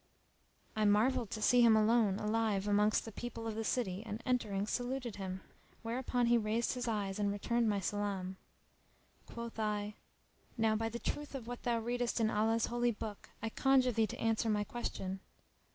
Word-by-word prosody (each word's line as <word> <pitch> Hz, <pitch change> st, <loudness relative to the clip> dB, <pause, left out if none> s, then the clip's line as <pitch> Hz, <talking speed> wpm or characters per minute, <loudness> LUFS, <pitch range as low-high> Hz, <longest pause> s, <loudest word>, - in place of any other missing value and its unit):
I 215 Hz, -, +1 dB
marvelled 215 Hz, +2 st, +3 dB
to 215 Hz, -, -4 dB
see 245 Hz, +2 st, +5 dB
him 230 Hz, -2 st, +7 dB
alone 215 Hz, -2 st, +3 dB
alive 210 Hz, -2 st, 0 dB
amongst 210 Hz, +1 st, +3 dB
the 225 Hz, -, -7 dB
people 230 Hz, +1 st, -6 dB
of 225 Hz, -, -2 dB
the 225 Hz, +1 st, -3 dB
city 205 Hz, -5 st, -1 dB
and 220 Hz, -1 st, -5 dB
entering 215 Hz, -6 st, 0 dB
saluted 245 Hz, 0 st, -3 dB
him; 190 Hz, -1 st, -5 dB, 0.4 s
whereupon 245 Hz, +1 st, 0 dB
he 235 Hz, 0 st, +4 dB
raised 220 Hz, +2 st, 0 dB
his 250 Hz, -1 st, -3 dB
eyes 205 Hz, -3 st, -1 dB
and 205 Hz, -1 st, +1 dB
returned 230 Hz, +3 st, +1 dB
my 205 Hz, -1 st, +1 dB
salam. 195 Hz, -1 st, -2 dB, 0.9 s
Quoth 235 Hz, -1 st, -7 dB
I, 210 Hz, -1 st, -1 dB, 0.6 s
"Now 220 Hz, -1 st, +3 dB
by 225 Hz, +1 st, -1 dB
the 235 Hz, -, -4 dB
Truth 295 Hz, +4 st, -4 dB
of 255 Hz, -4 st, -5 dB
what 245 Hz, 0 st, -6 dB
thou 240 Hz, -1 st, +1 dB
readest 240 Hz, +1 st, -1 dB
in 220 Hz, -1 st, +2 dB
Allah's 225 Hz, +2 st, +2 dB
Holy 240 Hz, 0 st, +1 dB
Book, 215 Hz, -2 st, -6 dB
I 225 Hz, -, 0 dB
conjure 260 Hz, +1 st, +3 dB
thee 225 Hz, -1 st, +2 dB
to -, -, -7 dB
answer 225 Hz, 0 st, +1 dB
my 210 Hz, -1 st, +2 dB
question." 195 Hz, -4 st, -4 dB
225 Hz, 180 wpm, -34 LUFS, 210-240 Hz, 0.9 s, him